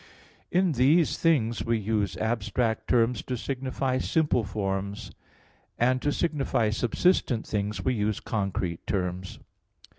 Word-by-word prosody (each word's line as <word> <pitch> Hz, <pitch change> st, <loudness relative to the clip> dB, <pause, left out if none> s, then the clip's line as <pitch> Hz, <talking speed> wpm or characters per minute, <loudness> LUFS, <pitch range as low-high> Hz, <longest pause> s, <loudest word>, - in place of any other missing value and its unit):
In 180 Hz, 0 st, +2 dB
these 145 Hz, +5 st, +3 dB
things 120 Hz, -9 st, +2 dB
we 115 Hz, 0 st, +1 dB
use 105 Hz, -1 st, -1 dB
abstract 110 Hz, 0 st, -1 dB
terms 120 Hz, -1 st, +2 dB
to 125 Hz, -, -4 dB
signify 130 Hz, +1 st, -2 dB
simple 150 Hz, -5 st, +1 dB
forms; 100 Hz, -1 st, -3 dB, 0.7 s
and 130 Hz, +2 st, +2 dB
to 145 Hz, -, +1 dB
signify 140 Hz, -9 st, 0 dB
subsistent 120 Hz, -, +1 dB
things 105 Hz, 0 st, -3 dB
we 130 Hz, -, +2 dB
use 105 Hz, -2 st, -1 dB
concrete 95 Hz, -5 st, -3 dB
terms. 90 Hz, -1 st, -2 dB
115 Hz, 120 wpm, -27 LUFS, 105-130 Hz, 0.7 s, these